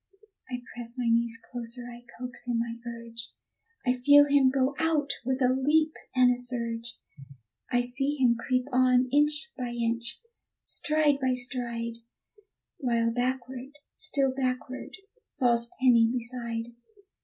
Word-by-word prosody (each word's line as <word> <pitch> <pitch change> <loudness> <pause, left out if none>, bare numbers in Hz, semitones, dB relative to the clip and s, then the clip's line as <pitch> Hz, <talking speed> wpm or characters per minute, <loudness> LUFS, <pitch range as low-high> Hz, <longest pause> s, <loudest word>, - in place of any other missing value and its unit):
I 250 -1 -5
press 240 0 -4
my 245 -2 0
knees 230 0 +2
closer, 240 0 -5
I 240 0 -11 0.2
coax 250 0 -5
him, 240 -1 0
I 230 0 -7
urge, 230 0 -6 0.5
I 250 - +3
feel 285 +3 +6
him 280 -2 +4
go 265 +1 +1
out 315 -3 +1
with 260 +1 -1
a 250 0 +4
leap 305 +4 +2 0.2
and 250 -1 +5
a 245 - -5
surge; 235 -1 -2 0.7
I 245 - +3
see 270 +4 0
him 250 -4 +3
creep 255 +2 -1
on, 255 0 +3
inch 300 +2 +2
by 250 -2 -4
inch, 235 0 -2 0.4
stride 300 -1 +1
by 260 -2 +1
stride, 235 -2 -1 0.8
While 235 -4 +1
backward, 255 +3 -3 0.2
still 270 -2 +1
backward, 260 +2 -3 0.4
falls 235 -3 +3
Tenny 235 -3 +5
beside. 235 -1 -3
250 Hz, 135 wpm, -28 LUFS, 235-265 Hz, 0.8 s, feel